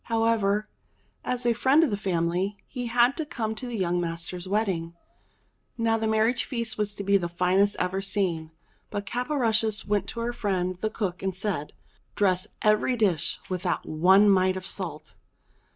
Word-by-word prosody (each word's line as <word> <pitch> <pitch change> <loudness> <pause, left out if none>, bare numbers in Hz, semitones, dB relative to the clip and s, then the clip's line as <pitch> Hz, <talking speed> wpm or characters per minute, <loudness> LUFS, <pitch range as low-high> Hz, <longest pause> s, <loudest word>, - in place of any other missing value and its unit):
However, 225 -2 +1 0.6
as 250 -1 -1
a 240 - +4
friend 270 +7 +4
of 295 - +1
the - - +1
family, 185 0 -1
he 245 -3 -5
had 240 +3 +3
to 320 - -1
come 225 -7 -3
to 235 +3 -7
the 240 -2 -4
young 175 -2 0
master's 175 +2 -4
wedding. 185 -5 -1 0.8
Now 230 -1 +2
the 220 - 0
marriage 220 +3 +2
feast 235 -4 -3
was 205 -1 -1
to 200 - -5
be 200 0 +4
the 175 -3 -3
finest 185 +4 +2
ever 190 +2 -1
seen; 185 -5 -1 0.4
but 205 -1 -4
Caporushes 225 -4 0
went 200 -1 0
to 235 - -5
her 240 +1 -2
friend 185 -5 -1
the 215 +4 -2
cook 200 -4 -3
and 190 -2 -2
said: 185 -6 -3 0.4
"Dress 185 -1 +2 0.2
every 215 +4 +3
dish 190 -9 +1
without 180 -1 -2
one 190 +6 +5
mite 185 -1 +3
of 185 - -7
salt." 160 -7 -4
200 Hz, 170 wpm, -26 LUFS, 185-225 Hz, 0.8 s, one